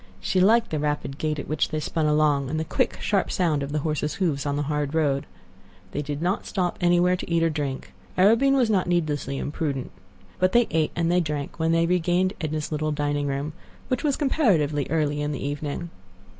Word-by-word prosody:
She 185 - +1
liked 225 +4 +4
the 155 - -1
rapid 150 -2 -2
gait 155 -1 -1
at 145 - -5
which 155 0 0
they 155 - -2
spun 155 +1 -1
along, 150 -3 +2
and 155 +2 -1
the 160 - -2
quick, - - 0
sharp 200 -2 0
sound 160 -6 +1
of 140 +1 -4
the 150 - -1
horses' 150 -1 -1
hoofs 150 -7 -1
on 140 - 0
the 145 - 0
hard 150 0 -2
road. 140 -4 +1 0.6
They 145 - -2
did 145 +2 -4
not 185 +4 -1
stop 180 -3 -1
anywhere 175 +1 +4
to 180 - -7
eat 165 0 +3
or 165 - +3
to - - -6
drink. 140 -3 -4 0.2
Arobin 230 +9 +5
was 255 -3 +3
not 195 -5 +1
needlessly 155 -5 -1
imprudent. 145 -3 -3 0.5
But 185 0 +2
they 240 0 +5
ate 160 -1 +2
and 170 0 +1
they 180 - +4
drank 150 -1 -4
when 160 0 +2
they 165 0 +3
regained 180 +2 +1
Edna's 155 -1 -3
little 155 0 -1
dining 145 -1 -1
room—which 150 - -5
was 290 -3 +1
comparatively 170 - +2
early 150 -1 0
in 150 0 -1
the 140 - -4
evening. 145 +4 -4
155 Hz, 210 wpm, -25 LUFS, 145-175 Hz, 0.6 s, Arobin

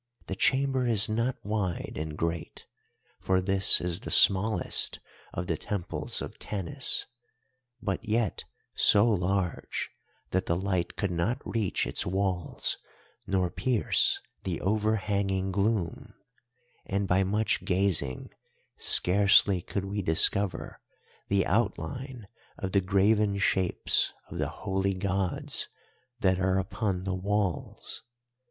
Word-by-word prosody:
The 95 - -4
chamber 130 +2 +1
is 110 -3 +4
not 115 +4 0
wide 100 -4 -2
and 75 -1 -5
great, 85 -1 -4 0.5
for 95 0 +1
this 95 +1 +4
is 90 0 -2
the 120 - -8
smallest 100 0 +4 0.3
of 85 - -4
the 85 -2 -2
temples 100 0 -3
of - - -9
Tanis, 105 +7 -1 0.8
but 100 +1 -2
yet 110 -2 -1 0.3
so 105 +3 +5
large 95 -4 -1 0.4
that 95 - 0
the 85 - +1
light 90 -1 -2
could 100 -3 -2
not 90 +10 -1
reach 110 -5 -1
its - - 0
walls 95 -3 -1 0.5
nor 95 -2 0
pierce 125 -5 +2 0.2
the 90 -4 -3
overhanging 100 -2 0
gloom, 100 -2 -1 0.7
and 100 0 -1
by 95 +1 +3
much 105 +3 0
gazing 90 - 0 0.5
scarcely 95 0 +5
could 100 +3 -4
we 100 +1 -3
discover 95 +3 +2 0.5
the 100 -1 +1
outline 115 - -2 0.3
of 95 - -4
the 100 - +3
graven 100 +2 +2
shapes 95 -2 +1 0.2
of - - -6
the - - -1
Holy 95 0 -2
Gods 95 -1 -1 0.5
that 95 -1 +2
are 95 0 +1
upon 95 0 -2
the 95 0 -2
walls. 100 -1 -3
95 Hz, 120 wpm, -28 LUFS, 90-105 Hz, 0.8 s, so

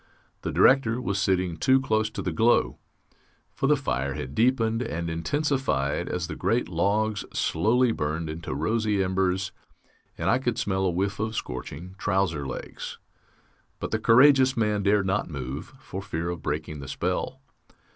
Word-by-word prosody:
The - - -3
Director 125 -3 +4
was 100 -5 -1
sitting 90 -3 +1
too 130 +10 +4
close 110 -4 +1
to - - -6
the 90 - -1
glow, 115 +9 +2 0.7
for - - 0
the - - +5
fire 65 +2 -2
had 65 +2 -5
deepened 115 - +2
and 85 -8 -3
intensified 85 - 0
as 90 -1 -2
the 80 -2 -6
great 120 +8 0
logs 105 +5 0
slowly 115 +8 +2
burned 80 -3 -2
into 80 -3 -5
rosy 105 +5 +1
embers, 95 0 0 0.7
and 85 - -2
I 100 +6 +4
could 120 -3 -1
smell 95 -1 0
a - - +3
whiff 95 +3 -1
of 110 +1 -2
scorching 70 +8 -6
trouser 95 -8 0
legs; 65 - -6 0.8
but - - -4
the 110 - 0
courageous 130 +3 +6
man 105 -2 +1
dared 100 0 +3
not 95 +1 0
move, 70 +1 -6
for 95 - -7
fear 85 -3 -3
of 85 - -6
breaking 75 0 -3
the 70 - -8
spell. - - -2
95 Hz, 160 wpm, -26 LUFS, 80-110 Hz, 0.8 s, courageous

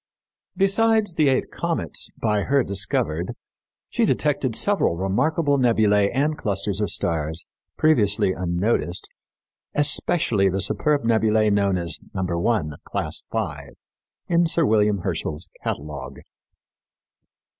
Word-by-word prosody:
Besides 215 0 +2
the 155 -4 +3
eight 130 - 0
comets - - -3
by 105 -1 +1
her 135 +5 +2
discovered, 95 -4 -1 0.5
she - - -1
detected - - +1
several - - +2
remarkable 140 - +1
nebulæ 105 -5 +3
and 145 +4 0
clusters 100 -3 -2
of 105 - 0
stars, 80 -1 -1 0.3
previously 105 -11 +2
unnoticed, 90 +1 -1 0.7
especially 140 - +2
the 95 +1 -1
superb 145 - +1
nebulæ 110 -2 +2
known 100 -2 +2
as 85 -1 -4 0.2
No. 95 - -1
1, 90 -1 0
Class - - -3
V, 75 -11 -4 0.5
in 170 -1 +3
Sir 165 0 +2
William 105 -4 +2
Herschel's 85 -1 -4
catalogue. 70 -2 -5
105 Hz, 115 wpm, -23 LUFS, 90-140 Hz, 0.7 s, the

